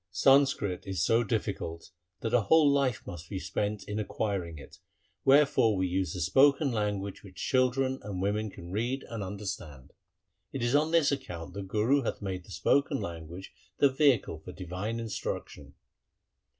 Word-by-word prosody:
Sanskrit 135 -5 +3
is 95 -3 0
so 115 +1 +3
difficult 100 -7 -3 0.3
that 115 0 -2
a 125 - +5
whole 155 +8 +5
life 140 -5 +2
must 85 -1 -8
be 100 - -4
spent 105 +2 -2
in 105 +1 -4
acquiring 100 -6 -3
it, 70 - -13 0.5
wherefore 135 -6 +5
we 95 0 0
use 90 -2 -1
the 90 - -3
spoken 140 - +4
language 105 -3 -2
which 95 -2 -13
children 130 +4 +1
and 100 -3 -5
women 105 +3 -1
can 85 -3 -10
read 120 +7 -1
and 115 -2 -5
understand. 95 -9 -6 0.6
1 - - -44
It 135 -3 -3
is 120 +1 +1
on 150 +2 +3
this 165 -3 +3
account 90 -12 -5
the 100 - -5
Guru 110 +8 +1
hath 120 - -3
made 95 -3 -5
the - - -18
spoken 140 +6 +1
language 85 +2 -7 0.2
the 140 - +5
vehicle 130 - +2
for 85 - -10
divine 95 +5 -4
instruction. 85 -10 -5
105 Hz, 165 wpm, -29 LUFS, 95-130 Hz, 0.6 s, a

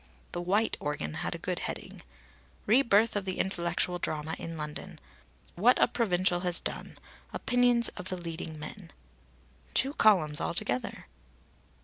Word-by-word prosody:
The 175 - -3
white 200 +5 +1
organ 145 - -3
had - - -3
a - - -4
good - - -3
heading: - - -5 0.6
"Re 240 +6 +5
birth 225 -3 +3
of 205 - 0
the 185 -1 -3
intellectual 175 -1 0
drama 155 -1 -2
in 165 -1 -6
London. 150 -1 -6 0.6
What 235 +8 +5
a - - +6
provincial 185 -5 +1
has 180 -1 +1
done. - - -3 0.4
Opinions 245 -1 +3
of 180 0 -7
the 185 - -2
leading 165 -2 -5
men." 165 +4 -7 0.9
Two 270 +2 +3
columns 170 - +4
altogether! 125 -7 -2
180 Hz, 140 wpm, -30 LUFS, 160-210 Hz, 0.9 s, a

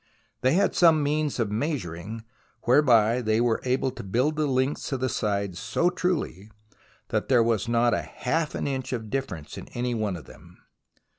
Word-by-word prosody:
They 130 - +3
had 200 +4 +3
some 160 -4 +5
means 150 0 0
of 110 -3 0
measuring 110 - -3 0.4
whereby 120 -3 +4
they 110 -1 +1
were 120 -1 +1
able 130 +1 0
to - - -8
build 125 +10 0
the 155 -1 0
lengths 130 +2 0
of 135 - -1
the 130 +1 0
sides 100 -5 -2
so 115 +11 +1
truly, 175 - -2 0.6
that - - -1
there 125 -3 +5
was 115 -1 0
not 120 0 +3
half 155 +4 -2
an - - -2
inch 130 -2 -3
of 110 -3 -5
difference 90 - -4
in - - -10
any 120 0 -1
one 105 -4 -1
of 85 - -9
them. - - -16
120 Hz, 175 wpm, -26 LUFS, 110-145 Hz, 0.6 s, some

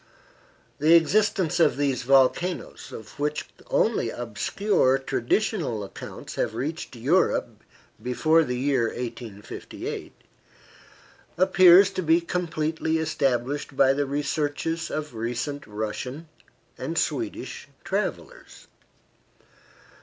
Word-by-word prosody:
The 155 +3 +6
existence 180 0 +2
of 165 - +4
these 140 -3 0
volcanoes, 135 +8 +1
of 110 +5 -10
which 150 +1 -1 0.2
only - - +1
obscure 130 - +1
traditional 135 - -1
accounts 100 - -9
had - - -1
reached 145 +3 -4
Europe 145 +11 +1 0.4
before 155 +6 +3
the 125 -4 -3
year 130 -2 +1
1858, 115 -3 -6 1.3
appears 185 +1 +7
to 185 - -3
be 165 0 +4
completely 160 -2 -1
established 140 -3 -1
by 135 0 +5
the 140 0 -1
researches 145 +3 -2
of 155 -3 -4
recent 120 +5 -4
Russian 110 +8 -5 0.5
and - - -4
Swedish - - -3 0.2
travelers. - - -4
145 Hz, 95 wpm, -25 LUFS, 125-165 Hz, 1.3 s, appears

